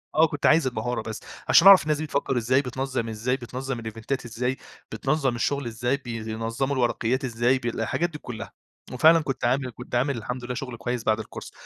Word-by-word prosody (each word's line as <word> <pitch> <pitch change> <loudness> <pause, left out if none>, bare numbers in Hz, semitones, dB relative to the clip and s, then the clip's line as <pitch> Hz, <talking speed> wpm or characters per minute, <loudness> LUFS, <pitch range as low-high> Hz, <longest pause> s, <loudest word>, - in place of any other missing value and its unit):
آه، 160 +1 +6
كنت 145 -1 -4
عايز 155 -3 +5
المهارة 120 0 -2
بس 110 0 -6 0.3
عشان 175 - +7
اعرف 195 -1 +10
الناس 150 -1 0
دي 155 - -3
بتفكّر 140 -3 -1
إزاي، 130 +4 +2
بتنظّم 130 -2 -3
إزاي، 120 +4 -1
بتنظّم 130 +1 -5
الإيفنتات 115 +4 -4
إزاي، 125 +3 -2 0.3
بتنظّم 135 -3 0
الشغل 140 +3 -1
إزاي 120 +4 -1
بينظموا 115 +2 -3
الورقيات 125 +1 0
إزاي 120 +2 +2
ب 120 - -10
الحاجات 120 +9 -1
دي 150 - -8
كلّها، 120 -6 -8 0.4
وفعلًا 160 +6 +6
كنت 135 -4 -3
عامل 130 +1 +1
كنت 125 +1 -7
عامل 130 +1 +1
الحمد 125 +3 -5
لله 125 - -3
شغل 125 -2 -5
كويس 120 0 -3
بعد 110 0 +2
الكورس 110 - -8
125 Hz, 190 wpm, -25 LUFS, 115-135 Hz, 0.4 s, اعرف